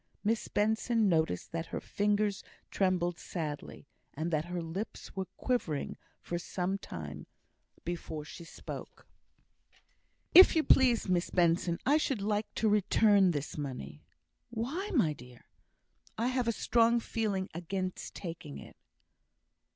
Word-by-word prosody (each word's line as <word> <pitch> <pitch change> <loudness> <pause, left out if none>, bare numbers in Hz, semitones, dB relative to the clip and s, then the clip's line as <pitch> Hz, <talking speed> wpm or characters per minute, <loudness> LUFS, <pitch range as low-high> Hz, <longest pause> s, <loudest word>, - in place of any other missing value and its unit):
Miss 220 +1 0
Benson 220 +1 +2
noticed 160 - +1
that 165 0 -3
her - - -4
fingers 205 0 0 0.3
trembled 175 -3 +1
sadly, 150 -5 -5 0.3
and 160 +4 -2
that 155 0 0
her 175 0 -3
lips 170 +7 -6
were 190 -1 -3
quivering 180 - -1 0.3
for 175 - -3
some 185 +2 -2
time 75 - -7 0.6
before 165 -3 -4
she 170 - -9
spoke. 165 - -9 1.3
"If 370 0 +10
you 320 - +4
please, 250 -7 +4
Miss 180 -1 +1
Benson, 170 -1 +2
I 290 +3 +5
should 270 -9 -1
like 210 +1 -1
to 220 - +1
return 205 -1 +4
this 150 -2 -3
money." 75 - -6 0.5
"Why, 265 - -3
my 165 - +3
dear?" 125 -3 -14 0.7
"I 235 +3 +1
have 255 -2 0
a - - +4
strong 235 +1 +3
feeling 210 -5 -1
against 185 +2 -4
taking 165 -5 -7
it. - - -12
185 Hz, 130 wpm, -31 LUFS, 165-220 Hz, 1.3 s, If